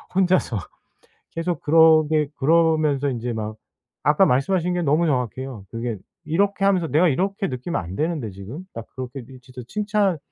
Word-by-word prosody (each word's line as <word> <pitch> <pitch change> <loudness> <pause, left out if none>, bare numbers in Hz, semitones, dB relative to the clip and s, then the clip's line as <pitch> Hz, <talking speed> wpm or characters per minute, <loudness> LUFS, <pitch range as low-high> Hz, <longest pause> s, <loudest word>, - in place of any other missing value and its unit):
혼자서. 185 - +2 0.7
계속 165 -2 -3
그러게 155 -1 +5
그러면서 155 -2 +2
인제 120 -1 -3
막. 110 -1 -4 0.5
아까 150 +6 +4
말씀하신 175 +7 +1
게 175 - 0
너무 155 +3 +2
정확해요. 125 -4 -3
그게 115 -1 -3 0.3
'이렇게 195 +6 0
하면서 190 -4 +3
내가 160 +4 +3
이렇게 195 +7 -1
느끼면 130 - -3
안 85 +2 -7
되는데 155 - -2
지금.' 100 - -9
딱 115 -1 -7
그렇게 130 0 -6
이 130 -1 -12
진짜 125 0 -11
칭찬, 205 - 0
150 Hz, 345 characters per minute, -23 LUFS, 125-175 Hz, 0.7 s, 그러게